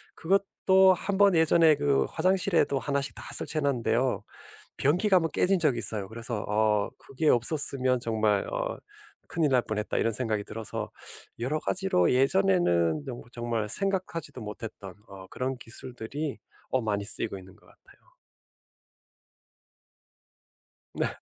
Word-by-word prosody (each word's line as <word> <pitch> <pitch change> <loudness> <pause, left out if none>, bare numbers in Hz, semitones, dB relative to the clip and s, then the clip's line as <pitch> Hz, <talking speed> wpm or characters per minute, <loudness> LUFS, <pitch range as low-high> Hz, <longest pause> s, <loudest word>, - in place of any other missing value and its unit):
그것도 190 +1 +3
한번 200 +1 +2
예전에 160 -1 +5
그 140 -1 +1
화장실에도 180 -4 +1
하나씩 140 0 -2
다 - - -9
설치해 155 - +1
놨는데요. 125 -2 0 0.5
변기가 180 +8 +2
한번 165 -3 0
깨진 190 0 +2
적이 140 -7 +2
있어요. 105 -2 +1
그래서 115 -1 -4
어 105 -1 +1
'그게 150 +3 -4
없었으면 130 0 +4
정말 110 -4 0
어 - - -3 0.5
큰일 160 -3 0
날 125 -2 +4
뻔했다.' 105 0 -3
이런 115 - +1
생각이 110 -3 -1
들어서 110 -2 -5 0.5
여러 145 +6 -1
가지로 185 - +1
예전에는 145 - +2
정말 120 -2 -8
정말 120 -3 -3
생각하지도 185 - -2
못했던 105 -3 -8
어 95 -1 -12
그런 130 0 -3
기술들이 125 +5 -5 0.3
어 130 - 0
많이 105 -2 -2
쓰이고 105 -2 +1
있는 95 0 -15
것 - - -24
같아요. - - -24 2.8
네. - - -1
130 Hz, 295 characters per minute, -27 LUFS, 110-160 Hz, 2.8 s, 예전에